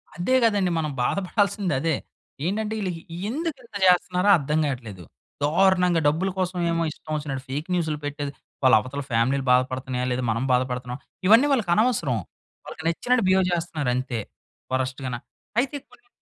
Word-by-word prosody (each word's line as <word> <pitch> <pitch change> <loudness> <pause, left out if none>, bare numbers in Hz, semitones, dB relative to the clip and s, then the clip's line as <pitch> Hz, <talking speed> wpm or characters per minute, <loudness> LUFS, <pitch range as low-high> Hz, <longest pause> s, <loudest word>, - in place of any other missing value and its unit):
అదే 215 +9 +1
గదండీ! 205 -5 +3
మనం 155 -2 -2
బాధపడాల్సిందదే. 185 - 0 0.5
ఏంటంటే, 215 +3 -1
ఈళ్ళకి 180 -4 -3 0.3
ఎందుకింత 270 -4 -4
చేస్తున్నారో 180 +2 +3
అర్థం 150 +1 0
గావట్లేదు. 115 -10 -5 0.4
దారుణంగా 180 +2 +3
డబ్బుల 165 +6 +1
కోసం 185 0 -1
ఏమో 165 0 +1
ఇష్టం 155 - -11
వచ్చినట్టు 140 -3 -4
ఫేక్ 150 +5 -3
న్యూస్‌లు 160 -4 0
పెట్టేది. 145 -1 -3 0.3
వాళ్ళ 130 -3 +7
అవతల 140 +4 -5
ఫ్యామిలీలు 130 +4 +1
బాధపడుతున్నాయా 130 0 +1
లేదా, 125 +1 -1
మనం 115 +3 -1
బాధపడుతున్నామా 125 0 -1 0.3
ఇవన్నీ 230 +7 +7
వాళ్ళకనవసరం. 205 - +2 0.5
వాళ్ళకి 160 - -9
నచ్చినట్టు 245 +8 +1
బిహేవ్ 190 0 +4
జేస్తున్నారంతే. 140 -8 -1 0.5
వరస్ట్ 130 +1 -1
గాన 125 -1 -2 0.4
అయితే 280 +3 0
కొన్ని 410 - -22
160 Hz, 135 wpm, -24 LUFS, 130-190 Hz, 0.5 s, వాళ్ళ